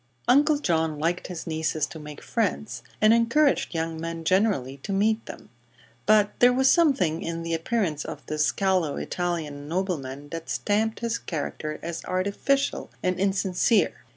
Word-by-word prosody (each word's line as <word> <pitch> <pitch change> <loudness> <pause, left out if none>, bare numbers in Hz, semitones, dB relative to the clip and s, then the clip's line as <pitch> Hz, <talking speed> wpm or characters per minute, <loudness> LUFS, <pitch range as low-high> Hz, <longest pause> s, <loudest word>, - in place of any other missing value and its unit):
Uncle 295 +3 +5
John 160 - 0
liked 165 +4 -1
his 180 -3 -6
nieces 160 -1 -1
to 160 - -10
make 150 -1 -10
friends, 75 +13 -2 0.2
and 215 +1 +6
encouraged 235 - +2
young 160 0 -2
men 165 0 -4
generally 185 - +1
to 140 - -7
meet 215 +3 +2
them; - - -10 0.6
but 210 -1 +5
there 245 0 +7
was 265 +1 +4
something 265 - +3
in 165 0 -4
the 165 0 -3
appearance 165 -3 -1
of - - -8
this 150 0 +1
callow 185 -6 +1
Italian 160 -5 -3
nobleman 145 -6 -3
that 165 0 -7
stamped 220 +2 0
his 235 0 -1
character 155 -1 -4
as 170 0 -5
artificial 200 +10 0
and 180 0 0
insincere. 195 +1 +2
175 Hz, 155 wpm, -26 LUFS, 160-215 Hz, 0.6 s, there